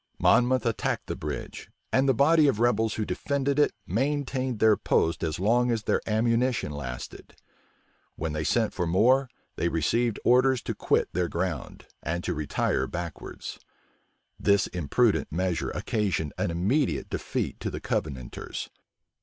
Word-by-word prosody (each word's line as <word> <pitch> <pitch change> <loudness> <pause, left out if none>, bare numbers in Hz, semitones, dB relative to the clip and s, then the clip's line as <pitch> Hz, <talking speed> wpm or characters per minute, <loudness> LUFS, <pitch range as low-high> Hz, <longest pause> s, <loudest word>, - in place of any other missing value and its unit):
Monmouth 125 0 +3
attacked 115 -2 -1
the - - -4
bridge - - -6 0.2
and 135 +1 +3
the - - +5
body 155 +4 +5
of 130 -6 +1
rebels 115 -2 +2
who 110 - -1
defended 140 +2 -1
it 145 - +4
maintained 130 - -1
their 110 0 +5
post 85 -4 +1
as 80 -1 -1
long 120 +5 +3
as 115 -3 0
their - - +1
ammunition 115 -3 +1
lasted. 65 -4 -7 0.8
When 80 -1 -3
they 75 0 -2
sent 110 +8 +1
for 90 -2 -1
more, 125 +9 +3 0.3
they 85 - +1
received 110 +9 0
orders 130 0 +4
to - - -3
quit - - +1
their 90 0 0
ground, 85 -4 -4 0.2
and 85 +2 -3
to - - -1
retire 75 -1 0
backwards. 85 -3 -6 0.8
This 100 -1 +3
imprudent 85 -6 +1
measure 90 +1 -1
occasioned 95 -8 -1
an - - -1
immediate 85 - 0
defeat - - -3
to - - -3
the - - -5
Covenanters. 65 -5 -4
110 Hz, 145 wpm, -27 LUFS, 85-125 Hz, 0.8 s, the